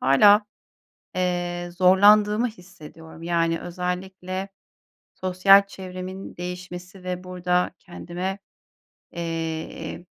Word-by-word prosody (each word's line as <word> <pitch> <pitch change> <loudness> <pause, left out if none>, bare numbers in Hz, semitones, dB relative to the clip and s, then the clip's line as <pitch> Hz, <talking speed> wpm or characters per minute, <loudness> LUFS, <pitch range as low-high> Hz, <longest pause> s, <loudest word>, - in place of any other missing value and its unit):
hâlâ, 205 +11 +6 0.7
eee, 175 -1 -1
zorlandığımı 210 +5 +5
hissediyorum. 165 -5 -13
Yani 165 -1 +1
özellikle, 185 +2 -4 0.6
sosyal 195 +2 +5
çevremin 185 0 -8
değişmesi 180 +1 -7
ve 180 0 -4
burada 180 -1 0
kendime, 180 +2 -5 0.7
eee, 165 0 -4
180 Hz, 75 wpm, -24 LUFS, 175-190 Hz, 0.7 s, hâlâ